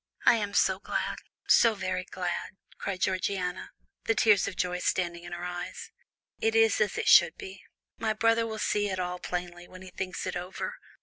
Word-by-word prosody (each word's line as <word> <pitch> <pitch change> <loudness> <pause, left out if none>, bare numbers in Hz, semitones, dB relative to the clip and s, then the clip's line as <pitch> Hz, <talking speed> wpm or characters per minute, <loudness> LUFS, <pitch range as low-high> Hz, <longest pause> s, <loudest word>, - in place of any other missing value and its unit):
"I - - +8
am 205 -2 -3
so 190 0 +3
glad, - - -3 0.3
so 230 -2 +5
very 185 -2 -3
glad," 180 +1 -4 0.2
cried 190 -2 -4
Georgiana, 185 -1 -1 0.4
the 225 - +2
tears 210 -4 +4
of 200 - -5
joy 180 0 -1
standing 175 -1 -1
in 175 - -9
her 175 0 -5
eyes. 180 0 -6 0.5
"It 225 0 +1
is 225 -1 +4
as 210 - +1
it - - -2
should 175 -2 +7
be. 190 0 -9 0.4
My 220 -1 0
brother 230 +1 +2
will 220 -1 -5
see 205 -1 0
it 190 - -2
all 180 0 -3
plainly, 175 -1 -5
when 185 0 -12
he 185 - -11
thinks 185 0 -4
it 185 - -3
over. 180 +1 -4
185 Hz, 190 wpm, -28 LUFS, 180-210 Hz, 0.5 s, I